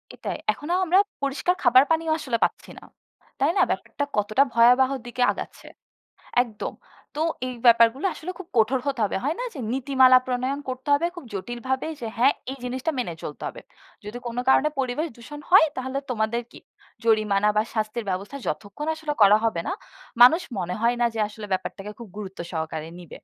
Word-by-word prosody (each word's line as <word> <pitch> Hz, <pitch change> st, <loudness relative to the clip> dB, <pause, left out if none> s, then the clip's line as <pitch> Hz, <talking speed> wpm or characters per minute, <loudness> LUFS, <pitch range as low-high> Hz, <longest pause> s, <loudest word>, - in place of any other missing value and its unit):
এটাই -, -, -5 dB, 0.2 s
এখনো 325 Hz, +4 st, -4 dB
আমরা 370 Hz, +2 st, +4 dB, 0.2 s
পরিষ্কার 280 Hz, +6 st, 0 dB
খাবার 255 Hz, +1 st, +7 dB
পানিও 325 Hz, 0 st, +1 dB
আসলে 250 Hz, -6 st, -1 dB
পাচ্ছি -, -, -2 dB
না। -, -, -19 dB, 0.6 s
তাই -, -, +3 dB
না? -, -, +5 dB
ব্যাপারটা 285 Hz, -, -2 dB
কতটা 215 Hz, +6 st, +3 dB
ভয়াবহ 250 Hz, +3 st, +5 dB, 0.2 s
দিকে 245 Hz, +1 st, -5 dB
আগাচ্ছে। -, -, -8 dB, 0.8 s
একদম। 220 Hz, -4 st, -6 dB, 0.4 s
তো 305 Hz, -, 0 dB, 0.3 s
এই 250 Hz, -, -5 dB
ব্যাপারগুলো 235 Hz, +7 st, +5 dB
আসলে 340 Hz, -, -6 dB
খুব 375 Hz, -, -9 dB
কঠোর 230 Hz, +4 st, +3 dB
হতে 275 Hz, -4 st, -1 dB
হবে। -, -, -1 dB
হয় 305 Hz, +4 st, 0 dB
না -, -, -2 dB
যে? -, -, -8 dB
নীতিমালা 260 Hz, -1 st, +5 dB
প্রণয়ন 255 Hz, +3 st, -1 dB
করতে 255 Hz, +2 st, -5 dB
হবে 310 Hz, +4 st, +1 dB
খুব 345 Hz, -, -8 dB
জটিলভাবে। 240 Hz, +6 st, -3 dB
যে 230 Hz, -, -4 dB
হ্যাঁ 265 Hz, +4 st, +5 dB, 0.2 s
এই 275 Hz, -, -7 dB
জিনিসটা 255 Hz, +5 st, -2 dB
মেনে 175 Hz, -9 st, -2 dB
চলতে 150 Hz, -, -7 dB
হবে। -, -, -10 dB, 0.4 s
যদি 215 Hz, +4 st, -6 dB
কোন 235 Hz, -, -5 dB
কারণে 285 Hz, +3 st, +5 dB
পরিবেশ 265 Hz, +5 st, -1 dB
দূষণ 290 Hz, +5 st, -10 dB
হয় 360 Hz, -3 st, +8 dB
তাহলে 260 Hz, +1 st, -3 dB
তোমাদের 230 Hz, 0 st, -1 dB
কি? -, -, -13 dB, 0.4 s
জরিমানা 210 Hz, -2 st, +3 dB
বা 215 Hz, -, +4 dB
শাস্তির 215 Hz, +1 st, -2 dB
ব্যবস্থা 195 Hz, +8 st, -4 dB
যতক্ষণ 215 Hz, +9 st, -4 dB
আসলে 315 Hz, -1 st, -4 dB
করা 205 Hz, +1 st, +7 dB
হবে 220 Hz, -7 st, 0 dB
না, -, -, -1 dB, 0.5 s
মানুষ 320 Hz, +9 st, +7 dB, 0.2 s
মনে 180 Hz, 0 st, -2 dB
হয় 235 Hz, +1 st, +2 dB
না 240 Hz, -, +4 dB
যে 220 Hz, -, -2 dB
আসলে 210 Hz, 0 st, -9 dB
ব্যাপারটাকে 195 Hz, +2 st, -4 dB
খুব 235 Hz, -, -9 dB
গুরুত্ব 195 Hz, -2 st, -7 dB
সহকারে 160 Hz, -1 st, -4 dB
নিবে। 175 Hz, -, -14 dB
245 Hz, 180 wpm, -24 LUFS, 215-275 Hz, 0.8 s, হয়